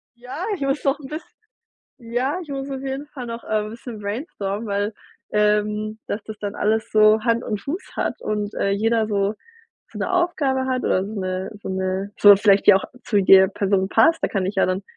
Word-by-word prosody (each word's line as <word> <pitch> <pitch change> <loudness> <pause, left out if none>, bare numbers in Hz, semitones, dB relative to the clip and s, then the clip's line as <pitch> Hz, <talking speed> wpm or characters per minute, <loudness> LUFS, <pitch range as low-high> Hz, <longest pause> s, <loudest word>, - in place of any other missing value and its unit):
ja, 250 +9 -6
ich 325 - -12
muss 275 +1 -1
noch 275 +1 +1
'n 270 - -9
biss 310 +3 -6 0.8
ja, 250 +8 -2
ich 310 - -11
muss 275 0 -4
auf 270 -1 -5
jeden 270 +2 -4
Fall 260 -5 -8
noch, 230 0 -6
äh, - - -15
'n 210 - -6
bisschen 230 -1 -9
brainstormen, 205 - -4
weil, 205 +2 -1 0.4
ähm 210 +1 +1
dass 205 - -3
das 215 -1 -8
dann 205 -1 -4
alles 220 +1 0
so 215 0 +5
Hand 235 0 +1
und 210 -2 -3
Fuß 325 +7 -6
hat - - -1
und, 210 -1 -3
äh, 200 - 0
jeder 220 +2 +1
so 200 0 0 0.6
so - - -9
'ne - - -1
Aufgabe 300 -8 +1
hat 255 -1 -1
oder 185 - +1
so 215 - -7
'ne 185 0 -3
so - - -5
'ne 190 +1 -2
so 205 -1 +9
vielleicht 200 0 +5
auch 190 - +2 0.2
zu 210 - 0
jeder 190 0 +7
Person 195 -1 0
passt, 325 +9 +4
da - - +3
kann 195 -3 -1
ich 195 +2 -3
ja - - +3
dann 185 +1 -2
215 Hz, 210 wpm, -22 LUFS, 200-260 Hz, 0.8 s, so